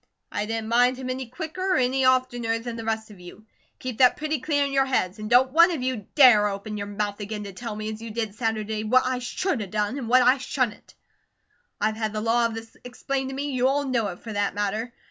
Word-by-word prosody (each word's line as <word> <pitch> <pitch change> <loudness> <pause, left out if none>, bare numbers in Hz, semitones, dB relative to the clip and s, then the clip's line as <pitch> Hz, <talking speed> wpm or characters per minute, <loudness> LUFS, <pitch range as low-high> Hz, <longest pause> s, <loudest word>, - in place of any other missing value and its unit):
I 210 - -2
didn't 225 0 -3
mind 245 +2 +3
him 255 -1 -4
any 260 -1 -4
quicker 315 +9 -7
or - - +3
any 260 +1 +1
oftener 245 -3 +2
than 230 0 -6
the 230 - -6
rest 220 -1 -3
of 200 - -14
you; 180 +4 -13 0.3
keep 255 -3 -6
that 250 -1 +6
pretty 305 -1 -2
clear 285 +1 +1
in 280 - -3
your 270 0 +2
heads, 215 -6 0
and 215 0 -5
don't 255 +2 +5
one 335 +4 +6
of 320 -8 -3
you 255 -6 -3
dare 245 -8 +7
open 205 +1 -5
your 200 -1 -4
mouth 205 0 -3
again 210 0 -5
to 200 -1 -8
tell 225 +2 -6
me, 215 0 -5
as 215 - -10
you 230 - -7
did 220 -2 -3
Saturday, 220 -1 -2
what 255 +4 +3
I 255 0 -1
SHOULD 290 - -2
a 205 - -4
done, 210 +6 -2
and 235 -4 -5
what 255 +1 +6
I 255 +2 +4
SHOULDN'T. 255 -4 -3 0.8
I've 215 +1 0
had 220 -1 -2
the 215 - -2
law 230 +1 +2
of 225 - -7
this 225 0 -9
explained 265 +2 -3
to 265 - -6
me; 285 +1 -3
you 255 -1 +2
all 285 +2 +1
know 240 -5 0
it 180 -2 -7
for 220 - -7
that 205 -1 -1
matter. 210 +3 -2
235 Hz, 250 wpm, -25 LUFS, 215-255 Hz, 0.8 s, dare